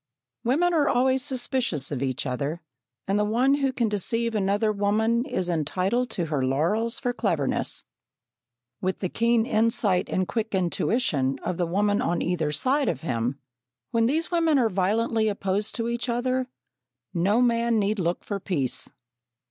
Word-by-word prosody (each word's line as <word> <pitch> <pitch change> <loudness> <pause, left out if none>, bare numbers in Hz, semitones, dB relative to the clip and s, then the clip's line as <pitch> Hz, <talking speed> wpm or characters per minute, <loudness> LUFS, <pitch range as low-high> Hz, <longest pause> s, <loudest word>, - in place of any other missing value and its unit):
Women 320 +9 +2
are 300 -3 +3
always 260 +1 +2
suspicious 250 - 0
of 135 -3 -3
each 130 0 -2
other, 140 +5 -2 0.5
and 200 +2 +1
the - - +3
one 240 +6 +2
who 275 -2 +1
can 245 -3 0
deceive 230 +3 -1
another 205 +1 +1
woman 215 +3 +1
is 185 -10 -2
entitled 185 - 0
to 175 - -2
her 150 -4 -1
laurels 170 - 0
for 245 -2 -1
cleverness. 165 - 0 1.0
With 185 0 -1
the 185 - -3
keen 230 +1 +2
insight 220 -5 +1
and 185 -1 0
quick 220 -3 -2
intuition 170 - 0
of 180 - -2
the 175 - 0
woman 205 +4 +1
on 170 0 0
either 165 -4 0
side 260 - +1
of 140 -5 -3
him, 125 -3 -2 0.5
when 230 0 +2
these 320 +7 0
women 330 -3 +3
are 235 -4 +3
violently 220 +4 +1
opposed 200 0 -1
to 230 -1 -2
each 235 +1 -2
other, 255 +2 0 0.7
no 195 +6 +2
man 235 -1 +2
need 210 0 0
look 175 0 -1
for 200 -2 -4
peace. 150 -10 -1
210 Hz, 160 wpm, -25 LUFS, 175-240 Hz, 1.0 s, are